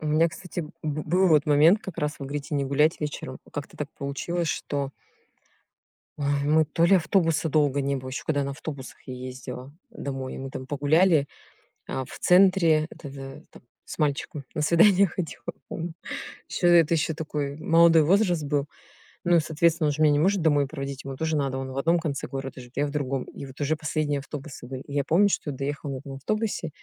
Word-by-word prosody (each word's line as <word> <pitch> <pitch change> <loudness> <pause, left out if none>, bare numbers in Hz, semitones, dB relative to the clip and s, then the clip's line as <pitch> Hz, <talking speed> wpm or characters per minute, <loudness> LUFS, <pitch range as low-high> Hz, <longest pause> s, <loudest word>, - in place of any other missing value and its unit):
У 155 - -5
меня, 155 +2 +4
кстати, 180 +2 -6
б 155 -2 -7
б 155 0 -2
был 185 +4 +3
вот 155 -3 +5
момент 155 +7 +5
как 190 - -8
раз, 150 0 -2
вы 140 - -6
говорите: 145 +2 -4
"Не 140 -1 +1
гулять 150 +5 +2
вечером". 150 -1 -5
Как-то - - -6
так - - -4
получилось, 165 +5 -2
что 140 -2 -2 1.3
Ой, 145 -1 0
мы 155 +2 +4
то 155 +2 +1
ли 185 +3 +6
автобуса 165 -2 +2
долго 145 -2 +2
не 140 0 0
было, 130 0 -6
еще 130 - -4
когда 145 -3 0
на 140 - -3
автобусах 140 -2 -8
я 130 - -6
ездила 125 +1 -7 0.2
домой. 135 -2 -5
Мы 135 - -5
там 130 - -6
погуляли, 145 +3 +3 0.6
а, 130 - -3
в - - -11
центре 180 -4 +5
это - - -11
это, 135 -1 -9
там, - - -16 0.2
с - - -9
мальчиком 145 -1 -1
на - - -2
свидание 185 +5 +5
ходила 175 -3 -6 0.2
помню. 170 0 -5 0.6
Еще, 175 - 0
э, 175 -1 +8
это 165 +1 0
еще 160 0 0
такой 150 -3 -3
молодой 165 0 +5
возраст 175 -1 +3
был. 145 0 0 0.6
Ну, 175 -1 +4
и - - +5
соответственно 160 0 +2
он - - +2
же 155 +2 +1
меня 150 - +6
не 145 - +2
может 190 +4 +2
домой 145 -3 +3
проводить, 140 -2 -6
ему 135 -1 -6
тоже 160 +3 -1
надо. 135 -3 0
Он 135 0 -4
в 130 - -7
одном 165 +5 +3
конце 150 -4 -3
города 135 -1 -6
живет, 125 0 -14
я 145 - +2
в 145 - -4
другом. 135 -3 -2
И 140 - -9
вот 130 - -13
уже 150 +2 +1
последние 155 -2 -1
автобусы 140 -2 -8
были. 130 0 -6
И 140 - -10
я 140 -1 +1
помню, 180 +8 +4
что 165 - -1
я 140 - -4
доехала 140 +1 -4
вот 130 - -7
на 135 -1 -7
автобусе 210 +4 -2
150 Hz, 210 wpm, -26 LUFS, 140-165 Hz, 1.3 s, э